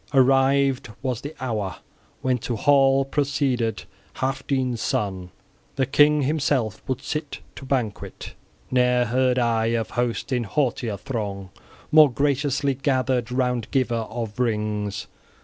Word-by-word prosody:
Arrived 135 0 +3
was 125 -3 -2
the 145 +2 -7
hour 105 -8 -2 0.5
when 130 -1 +1
to 120 0 -3
hall 135 +2 +4
proceeded 135 -5 0 0.3
Healfdene's 130 -2 -1
son: 95 -3 -2 0.5
the 135 - +1
king 145 +2 +4
himself 140 -7 0
would 130 0 -3
sit 150 -1 -4
to 135 - -9
banquet. 125 -6 -3 0.4
Ne'er 125 -1 +3
heard 125 +1 +1
I 115 -2 +2
of 115 - -3
host 120 +2 -2
in 125 -2 0
haughtier 120 -3 -1
throng 100 -7 -5 0.4
more 155 -3 +7
graciously 140 +1 +1
gathered 130 -3 0
round 125 -3 0
giver 130 -3 +1 0.2
of 115 -1 -5
rings! 105 -4 -1
125 Hz, 125 wpm, -24 LUFS, 115-135 Hz, 0.5 s, more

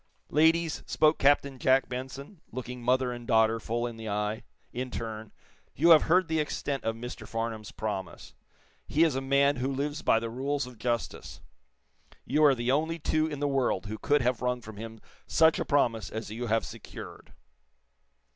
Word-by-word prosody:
"Ladies," 160 +1 +3
spoke 155 0 +3
Captain 140 -1 +3
Jack 130 +2 +3
Benson, 135 +7 -7
looking 125 0 -6
mother 125 +1 +2
and 120 -1 -8
daughter 110 0 +3
full 120 +2 -2
in 120 -1 -5
the 110 -1 -6
eye, 105 +2 -2 0.3
in 125 +1 -3
turn, 110 -2 -6 0.4
"you 170 +4 +5
have 160 - +9
heard 180 +1 +4
the 160 -1 0
extent 145 -2 -2
of 115 - -1
Mr. 115 -1 -8
Farnum's 115 -1 -4
promise. 95 -5 -5 0.5
He 155 - +3
is 160 -3 +3
a 135 - -1
man 140 +1 +3
who 125 +1 -1
lives 145 +2 -2
by 115 - +3
the 115 0 -5
rules 140 +3 -2
of 125 -3 -12
justice. 120 -1 -3 0.9
You 155 - +2
are 140 -2 +6
the 120 +1 0
only 160 +4 0
two 155 0 0
in 145 -2 -6
the 145 - +1
world 130 -8 0
who 110 +1 -6
could 145 -1 +2
have 125 -1 0
wrung 125 0 0
from 110 -3 -11
him 110 0 -8 0.3
such 160 0 +4
a - - -1
promise 115 - +1
as 110 -1 -6
you 120 +2 -4
have 115 +1 +1
secured." 115 0 -10
125 Hz, 185 wpm, -29 LUFS, 115-145 Hz, 0.9 s, have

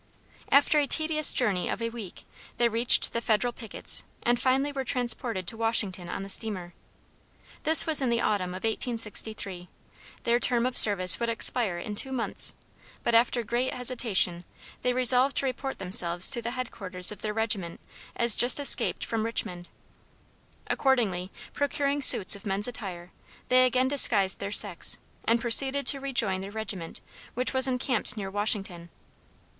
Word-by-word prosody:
After 285 +2 +3
a 285 - -2
tedious 310 -1 +3
journey 200 -8 -2
of - - -5
a 230 0 -5
week, 225 -6 -11 0.3
they 240 - +1
reached 235 +1 +1
the 235 - -3
Federal 235 +2 -1
pickets, 225 -3 0 0.2
and 240 0 0
finally 270 +3 -1
were 270 -1 -5
transported 235 -5 -3
to 175 - -1
Washington 205 -6 -1
on - - -6
the - - -9
steamer. 190 -4 -3 0.9
This 320 +1 +6
was 315 -3 0
in 260 - -2
the 235 0 -1
autumn 185 -5 -3
of 185 - -10
1863; 215 -5 -1 0.5
their 235 +1 0
term 245 -2 -1
of 255 0 -4
service 185 -5 +5
would 235 - -3
expire 230 -4 -1
in 210 +4 -8
two 265 +6 +1
months, 250 -3 +1 0.5
but 235 - -2
after 235 +1 +1
great 240 +4 -4
hesitation 230 -8 0 0.4
they 250 - -1
resolved 255 +2 +3
to - - +2
report 270 +1 -6
themselves 180 -1 +3
to 240 - -3
the 235 - -5
headquarters 195 -7 -1
of 210 -1 -11
their 210 -1 -5
regiment 210 -6 -3 0.4
as 235 -2 +4
just 245 +4 +6
escaped 285 - +4
from 225 -2 -4
Richmond. 180 -6 -5 1.0
Accordingly, 210 -10 -2 0.2
procuring 285 0 -3
suits 200 -8 +7
of 200 - -14
men's 200 0 0
attire, 185 -7 -8 0.4
they 255 0 +3
again 255 +1 -1
disguised 210 -9 +5
their 200 0 -7
sex 200 -4 0 0.3
and 230 +1 +1
proceeded 265 +4 +2
to 275 - 0
rejoin 230 -9 -2
their 195 - -9
regiment, 205 -5 -6 0.3
which 250 +3 -2
was 260 0 +3
encamped 250 -4 -1
near 195 -2 -7
Washington. 195 -4 -3
230 Hz, 160 wpm, -25 LUFS, 195-255 Hz, 1.0 s, suits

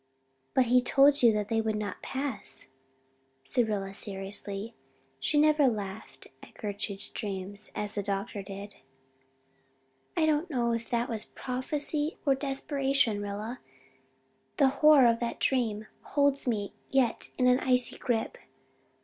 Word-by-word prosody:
"But 260 - +5
he 250 +1 +4
told 275 +3 +5
you 235 -2 +7
that 210 -1 -2
they 225 0 +2
would 220 -1 -1
not 210 -2 -4
pass," 265 -4 -4 0.7
said 225 - +1
Rilla, 195 -2 -2
seriously. 200 +2 -2 0.5
She 215 - 0
never 300 -2 +5
laughed 210 -2 -4 0.2
at - - -15
Gertrude's 200 -2 -5
dreams 200 -1 -6
as 210 0 -3
the 205 - -1
doctor 200 +1 -3
did. 200 +1 -9 1.4
"I 325 - +4
do 315 - +4
not 340 +4 -6
know 240 -5 0
if 230 0 -3
that 235 0 0
was 225 -2 -1
prophecy 295 +4 -2
or 275 - +5
desperation, 270 -4 0
Rilla, 210 +4 -5 1.0
the 275 -3 +5
horror 295 -1 +6
of 230 -1 +4
that 235 -1 -3
dream 225 -5 0 0.2
holds 280 -2 +1
me 205 -4 -1 0.2
yet 260 -4 +1
in 255 - +2
an 250 0 +5
icy 250 -1 +2
grip. 235 -3 -1
235 Hz, 140 wpm, -29 LUFS, 205-270 Hz, 1.4 s, you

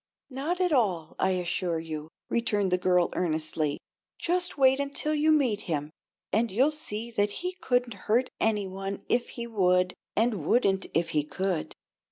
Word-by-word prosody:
"Not 295 +8 -2
at 365 -2 +2
all, 190 - +1
I 190 - +3
assure 175 -1 -1
you," 155 -1 -6 0.2
returned 210 -5 0
the 180 - +2
girl, 180 -1 +3
earnestly. 155 -3 -1 0.4
"Just 355 0 0
wait 265 0 +5
until 280 +2 -1
you 305 +1 +3
meet 255 -9 +2
him, 150 -1 -2 0.4
and 225 +3 +2
you'll 260 +10 +3
see 235 -7 -4
that 205 -2 +1 0.2
he 365 - -1
couldn't 245 -2 +1 0.2
hurt 245 +4 +3
any 210 -2 +1
one 195 +1 -5
if 240 0 +1
he 235 - -3
would, 180 -5 +2 0.2
and 220 -6 +1
wouldn't 195 +1 +2
if 165 0 +2
he 150 -2 +1
could." 185 +2 -2
205 Hz, 165 wpm, -28 LUFS, 180-255 Hz, 0.4 s, wait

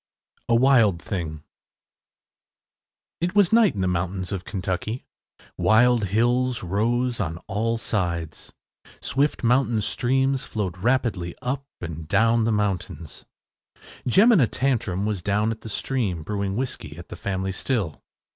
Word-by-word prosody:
A 115 - +5
WILD 115 -8 +4
THING 80 -4 -5 1.8
It 180 +3 -1
was 205 -1 +4
night 225 - +5
in 95 - -2
the 95 - +1
mountains 90 +1 -2
of 95 -3 -4
Kentucky. 100 +4 -3 0.5
Wild 120 0 +4
hills 120 +4 +1
rose 120 +6 0
on 80 -5 -2
all 115 +4 -1
sides. 85 -8 -3 0.5
Swift 140 +3 0
mountain 120 -1 +3
streams 130 +4 +1
flowed 95 -4 -4
rapidly 110 -6 0
up 135 +2 -3
and 80 -2 -6
down 115 +5 +3
the 115 - +1
mountains. 95 -6 -3 0.8
Jemina 195 - +5
Tantrum 110 -8 0
was 105 -4 -2
down 105 +4 +1
at 110 - -6
the 110 - -8
stream, 105 -8 -2
brewing 100 +1 -2
whiskey 120 - -4
at 85 - -11
the - - -7
family 95 -1 -2
still. 95 - -2
110 Hz, 130 wpm, -24 LUFS, 95-125 Hz, 1.8 s, A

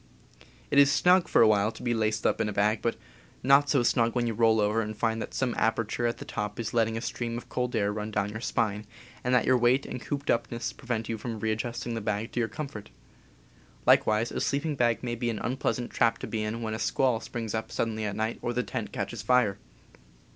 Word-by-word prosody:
It 140 - +5
is 140 0 +7
snug, 180 +2 +4
for - - +5
a - - +6
while, 105 0 +3
to - - -11
be 120 -1 +1
laced 110 -1 0
up - - +2
in 105 - 0
a - - -2
bag, 105 +2 +1
but 115 - 0 0.5
not 140 +2 +5
so 135 -4 +3
snug 115 -1 +2
when 120 -1 +1
you 115 - -1
roll 110 0 +3
over 105 +2 +2
and 110 -1 -5
find 115 -1 0
that - - -6
some 130 -3 0
aperture 115 +1 0
at 115 - -2
the - - -8
top 105 0 -4
is 115 - -3
letting 115 -1 +1
a - - -4
stream 120 -1 -3
of 120 - -9
cold 125 0 -2
air 105 -1 +1
run 105 0 -4
down 100 -1 -1
your 110 +1 -6
spine, 105 -3 -1 0.4
and 125 - 0
that 125 - +3
your 130 -1 +4
weight 120 +3 +3
and 125 - -6
cooped 140 +5 -2
up 115 -2 0
ness 115 -1 -3
prevent 120 -4 -3
you 115 -1 -3
from 115 -1 -5
readjusting 115 +3 -2
the 115 - -3
bag 105 +1 -2
to - - -2
your 115 -1 0
com 155 - -5
fort. 105 -6 -10 1.0
Likewise 110 +2 +4
a - - -3
sleeping 145 +2 0
bag 120 -3 +1
may 120 -1 -2
be 120 0 -2
an 115 - -2
unpleasant 125 +1 -2
trap 115 -1 +2
to - - -6
be 110 - -3
in 110 +2 -3
when 110 -1 -2
a 110 - -4
squall 125 -4 +1
springs 115 -2 -5
up 110 0 -3
suddenly 110 -1 -2
at 100 -2 -2
night, 110 +2 -2
or 120 - -2
the 125 +1 0
tent - - -5
catches - - -4
fire. 125 -6 +2
115 Hz, 245 wpm, -28 LUFS, 110-120 Hz, 1.0 s, is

